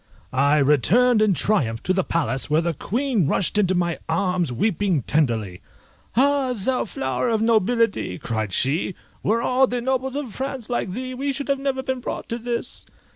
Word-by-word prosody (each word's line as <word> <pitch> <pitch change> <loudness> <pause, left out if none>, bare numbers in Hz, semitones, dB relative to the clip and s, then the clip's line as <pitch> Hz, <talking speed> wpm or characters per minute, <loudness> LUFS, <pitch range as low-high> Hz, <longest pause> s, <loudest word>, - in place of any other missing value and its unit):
I 140 +3 +3
returned 195 - +4
in 210 -4 +3
triumph 125 - 0
to 185 - +1
the 190 0 +1
palace, 150 -6 -1
where 150 +1 +3
the 170 0 -1
Queen 230 - 0
rushed 195 +5 +1
into 185 -2 +2
my 175 -1 0
arms, 180 -2 0
weeping 180 - 0
tenderly. 115 - 0 0.6
"Ah, 275 -1 +3
thou 250 +5 0
flower 130 - -2
of 225 -1 +1
nobility," 225 - +1
cried 110 -3 -3
she, 145 - +1 0.3
"were 230 +3 +1
all 260 +1 +3
the 245 0 -2
nobles 260 +1 -1
of 275 -7 -4
France 265 -3 -5
like 200 -6 -1
thee, 255 +3 -5
we 275 +2 -2
should 280 0 -1
never 275 -1 -1
have - - -17
been 260 -1 -1
brought 245 - -5
to 235 - -3
this!" 235 0 -4
210 Hz, 180 wpm, -23 LUFS, 155-250 Hz, 0.6 s, returned